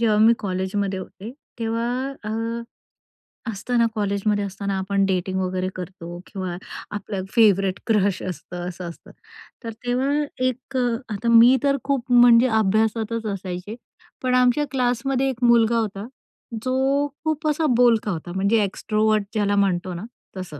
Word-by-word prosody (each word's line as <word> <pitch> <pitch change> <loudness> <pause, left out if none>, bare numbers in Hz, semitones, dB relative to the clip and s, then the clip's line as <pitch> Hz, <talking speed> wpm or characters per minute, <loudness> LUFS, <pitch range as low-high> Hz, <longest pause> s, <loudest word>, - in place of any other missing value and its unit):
जेव्हा 220 -2 +3
मी 220 +2 +6
कॉलेजमध्ये 190 0 -2
होते 195 +3 -9 0.3
तेव्हा 230 0 -1 0.4
अ, - - -4 1.2
असताना 235 +3 0
कॉलेजमध्ये 205 0 0
असताना 200 0 -3
आपण 195 +1 0
डेटिंग 190 0 -1
वगैरे 185 0 -1
करतो 175 -2 -8
किंवा 185 -3 -5 0.4
आपलं 205 -2 -4
फेव्हरेट 195 -5 +3
क्रश 205 -4 +2
असतं, 175 0 -6
असं 175 -1 -7
असतं. 170 - -13 0.5
तर 230 - -4 0.2
तेव्हा 250 +3 0 0.4
एक 255 +1 -4
अ, 245 -2 +1 0.2
आता 210 +3 -4
मी 235 +3 +8
तर 280 -1 +3
खूप 265 -3 -2
म्हणजे 240 0 +7
अभ्यासातच 220 +2 0
असायचे, 185 +2 -6 0.5
पण 255 0 +1
आमच्या 250 +4 +3
क्लासमध्ये 260 +1 0
एक 250 -2 -5
मुलगा 235 -1 +4
होता, 210 -1 -3 0.6
जो 270 +2 +1 0.2
खूप 315 0 -1
असा 305 +1 +1
बोलका 230 -3 +3
होता, 175 0 -5
म्हणजे 205 +3 +2
एक्स्ट्रोव्हर्ट 215 +2 0
ज्याला 205 -2 +1
म्हणतो 185 -2 +1
ना, 175 +2 -6 0.3
तसं. 180 -6 -7
215 Hz, 140 wpm, -23 LUFS, 190-240 Hz, 1.2 s, मी